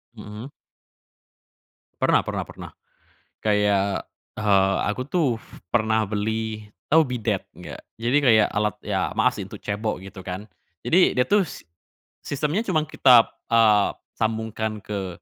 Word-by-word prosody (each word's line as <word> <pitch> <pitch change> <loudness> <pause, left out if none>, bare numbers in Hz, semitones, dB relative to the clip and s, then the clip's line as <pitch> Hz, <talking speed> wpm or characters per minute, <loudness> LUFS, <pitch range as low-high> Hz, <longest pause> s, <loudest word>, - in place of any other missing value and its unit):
Mhm. 105 +4 -9 1.5
Pernah - - +3
pernah - - -2
pernah. - - -10 0.7
Kayak, 105 -2 +1 0.3
eee, 95 -2 +3
aku 115 +5 -2
tuh, 145 -5 0 0.3
pernah 110 -2 +1
beli, 110 +1 -2 0.2
tau 160 +2 +5
bidet, 115 -7 -2
nggak? - - -10 0.2
Jadi 120 +4 +1
kayak, 110 -4 +5
alat 105 +1 -1
ya - - -2
maaf - - +2
sih, - - -4
untuk - - -11
cebok, 105 -1 -3
gitu 95 -1 -11
kan. 95 +4 -6 0.3
Jadi, 180 +2 +4
dia 125 0 +1
tuh, 205 -1 +4
s 160 - -9 0.6
sistemnya 150 +7 -1
cuman 180 -9 0
kita, 125 -6 +6 0.2
eee, 110 -3 +5 0.2
sambungkan 110 -1 -3
ke 100 -3 -4
110 Hz, 130 wpm, -24 LUFS, 105-125 Hz, 1.5 s, kita